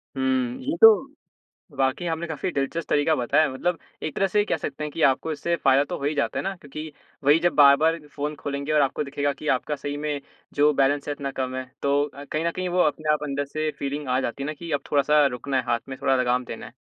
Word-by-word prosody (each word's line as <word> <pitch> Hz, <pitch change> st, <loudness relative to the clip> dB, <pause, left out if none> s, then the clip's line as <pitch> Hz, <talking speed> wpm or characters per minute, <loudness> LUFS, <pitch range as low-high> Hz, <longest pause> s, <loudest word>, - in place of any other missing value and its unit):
हुँ। 130 Hz, -2 st, 0 dB
ये 130 Hz, -, -1 dB
तो 225 Hz, -, +12 dB, 0.9 s
वाक़ई 135 Hz, +5 st, 0 dB
आपने 165 Hz, +1 st, -2 dB
काफ़ी 160 Hz, +2 st, -3 dB
दिलचस्प 140 Hz, +4 st, -2 dB
तरीका 145 Hz, +2 st, +3 dB
बताया। 145 Hz, +4 st, +2 dB
मतलब 170 Hz, +6 st, -1 dB, 0.2 s
एक 155 Hz, -, -3 dB
तरह 195 Hz, -, +2 dB
से 205 Hz, +2 st, +2 dB
कह -, -, 0 dB
सकते 150 Hz, +2 st, -5 dB
हैं 150 Hz, -, -4 dB
कि 165 Hz, -, -3 dB
आपको 140 Hz, +4 st, +2 dB
इससे 165 Hz, +3 st, -1 dB
फ़ायदा 135 Hz, -2 st, +3 dB
तो -, -, -5 dB
हो 140 Hz, -, -6 dB
ही 145 Hz, +2 st, 0 dB
जाता 140 Hz, -, -1 dB
है -, -, -1 dB
ना। 195 Hz, 0 st, -3 dB
क्योंकि 155 Hz, 0 st, -8 dB, 0.3 s
वही 145 Hz, +3 st, +6 dB
जब 175 Hz, -2 st, +1 dB
बार-बार 150 Hz, +3 st, +5 dB
फ़ोन 145 Hz, +1 st, -4 dB
खोलेंगे 140 Hz, +1 st, -4 dB
और 150 Hz, -, +4 dB
आपको 140 Hz, +2 st, 0 dB
दिखेगा 145 Hz, 0 st, -1 dB
कि 150 Hz, +2 st, -7 dB
आपका 150 Hz, +3 st, -4 dB
सही 145 Hz, +1 st, -5 dB
में 145 Hz, -1 st, -3 dB, 0.3 s
जो 145 Hz, +1 st, +4 dB
बैलेंस 140 Hz, +1 st, +1 dB
है 145 Hz, -, 0 dB
इतना 140 Hz, -1 st, -4 dB
कम 130 Hz, -1 st, -3 dB
है 130 Hz, -, -3 dB, 0.2 s
तो 140 Hz, +1 st, +2 dB
अ, 140 Hz, 0 st, -9 dB
कहीं 155 Hz, +1 st, -3 dB
न -, -, +2 dB
कहीं 185 Hz, +2 st, -3 dB
वो 180 Hz, +1 st, +1 dB
अपने 150 Hz, 0 st, +1 dB
आप 150 Hz, -, -1 dB
अंदर 140 Hz, 0 st, -2 dB
से 155 Hz, +2 st, -3 dB
एक -, -, -5 dB
फ़ीलिंग 140 Hz, 0 st, -4 dB
आ 125 Hz, +1 st, +2 dB
जाती 135 Hz, +2 st, -4 dB
है -, -, -3 dB
ना 150 Hz, -, -2 dB
कि 165 Hz, +3 st, -9 dB
अब 145 Hz, -1 st, 0 dB
थोड़ा-सा 150 Hz, +1 st, +4 dB
रुकना 135 Hz, +1 st, -2 dB
है, 130 Hz, -, +2 dB
हाथ 120 Hz, -1 st, +1 dB
में 130 Hz, -1 st, -7 dB
थोड़ा 135 Hz, -, +3 dB
लगाम 125 Hz, 0 st, +1 dB
देना 115 Hz, -, -7 dB
है। -, -, -13 dB
145 Hz, 255 wpm, -24 LUFS, 135-155 Hz, 0.9 s, तो